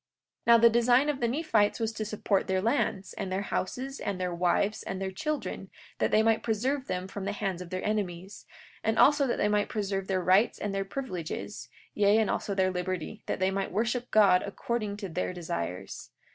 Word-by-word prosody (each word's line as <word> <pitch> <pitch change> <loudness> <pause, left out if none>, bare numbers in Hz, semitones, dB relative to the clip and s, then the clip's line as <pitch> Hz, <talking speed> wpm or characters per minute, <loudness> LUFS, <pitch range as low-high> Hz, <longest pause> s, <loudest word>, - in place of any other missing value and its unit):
43:9 - - -64
And - - -58
now 235 0 +8
the 230 - +2
design 245 +4 +4
of 285 -2 -1
the 235 - +1
Nephites 230 -6 +1
was 225 -1 -1
to 215 -1 -4
support 205 -2 0
their 190 -1 +1
lands, 205 -2 0
and 195 -2 -5
their 190 +2 -1
houses, 260 +8 -3
and 200 -2 -3
their 180 -1 -2
wives, 180 +4 +1
and 190 - -5
their 190 0 -3
children, 300 +10 -4 0.3
that - - +2
they 215 - +4
might 225 0 +3
preserve 255 +5 -1
them 185 0 -3
from 195 0 -6
the 200 - -1
hands 195 -4 -3
of 180 - -8
their 185 +1 -4
enemies; 195 -3 -3 0.4
and 220 +1 +1
also 290 -1 +5
that 240 - 0
they - - +2
might 210 0 +1
preserve 195 -2 -2
their 185 -2 0
rights 190 +6 +4
and 205 -1 -3
their 195 0 -1
privileges, 195 - -5 0.2
yea, 205 +1 +4
and 220 -2 +2
also 200 - -2
their 190 -1 +2
liberty, 185 +2 -4
that - - -2
they 190 +1 +2
might 195 0 -2
worship 235 +5 -1
God 195 -4 +5
according 210 0 -3
to 205 -2 -5
their 180 +1 -3
desires. 90 - -5
200 Hz, 215 wpm, -29 LUFS, 185-225 Hz, 0.4 s, now